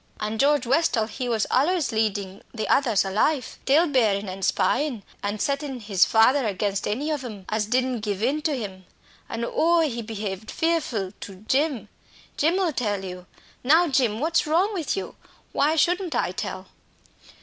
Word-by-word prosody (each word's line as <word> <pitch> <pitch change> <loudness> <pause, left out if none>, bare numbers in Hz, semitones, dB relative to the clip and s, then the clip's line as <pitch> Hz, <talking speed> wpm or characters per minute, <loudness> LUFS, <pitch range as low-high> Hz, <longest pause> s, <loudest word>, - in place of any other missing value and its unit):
An' 215 +1 -3
George 285 -1 +3
Westall, 260 -3 +2
he 245 +3 -5
was 225 -3 +1
allays 315 +4 +2
leading 205 -3 -1
the 220 -2 -4
others 230 -8 +3
a 195 - -3
life 255 +6 0
tale 305 +6 +5
bearing 220 - +1
an' 190 +1 -6
spyin', 240 +4 0 0.2
an' 205 +1 -2
settin' 275 +2 -2
his 205 -4 +3
father 255 +5 +4
against 200 0 -1
any 275 +9 -1
of 295 -3 -2
'em 210 -6 -8
as 215 -1 -1
didn't 255 +1 0
give 210 -1 -3
in 285 +5 +1
to 300 -3 0
him. 190 -5 -7 0.4
An', 230 +1 -3
oh, 335 +1 +3
he 250 -7 -1
behaved 215 -2 -5
fearful 275 - -1
to 195 - -8
Jim! 280 -3 +1 0.5
Jim 325 +5 +2
ull 365 -5 +1
tell 205 -6 -2
you. 180 -1 -8 0.4
Now, 320 +7 +5
Jim, 245 -6 +1
what's 320 +2 +1
wrong 360 +7 +2
with 350 -1 -2
you 390 - -5 0.4
why 300 +3 +2
shouldn't 355 +2 +1
I - - 0
tell?" - - -5
245 Hz, 170 wpm, -24 LUFS, 210-300 Hz, 0.5 s, tale